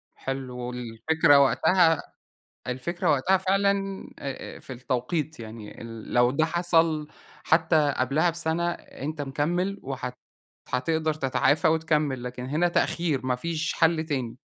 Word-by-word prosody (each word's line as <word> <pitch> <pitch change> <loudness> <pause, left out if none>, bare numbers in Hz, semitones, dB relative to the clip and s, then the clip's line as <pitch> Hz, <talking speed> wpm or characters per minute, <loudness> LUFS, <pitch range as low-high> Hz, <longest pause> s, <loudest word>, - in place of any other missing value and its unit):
حلو 135 -2 -5
والفكرة 125 +5 +2
وقتها 160 +4 +4 0.7
الفكرة 170 +8 -1
وقتها 165 +8 +3
فعلًا، 195 +1 +2 0.5
آآ، 135 -1 -6
آآ، - - -10
في 130 - -9
التوقيت، 130 +4 -2
يعني 110 -1 -9
ال 115 -1 -9
لو 120 0 +5
ده 155 +4 +2
حصَل 165 -2 +2 0.4
حتّى 160 -3 +3
قبلها 140 +7 +2
بسَنة، 170 +1 -1
أنت 150 0 -6
مكمِّل 175 +8 -1
وهت 125 -2 -5 0.5
هتقدَر 155 +4 0
تتعافى 145 +2 +2
وتكمِّل، 155 -5 +1
لكن 125 0 -6
هنا 160 +6 +1
تأخير 160 -6 0
ما 125 - +2
فيش 165 +3 -2
حل 165 -1 +2
تاني. 130 -7 -3
150 Hz, 130 wpm, -26 LUFS, 130-165 Hz, 0.7 s, لو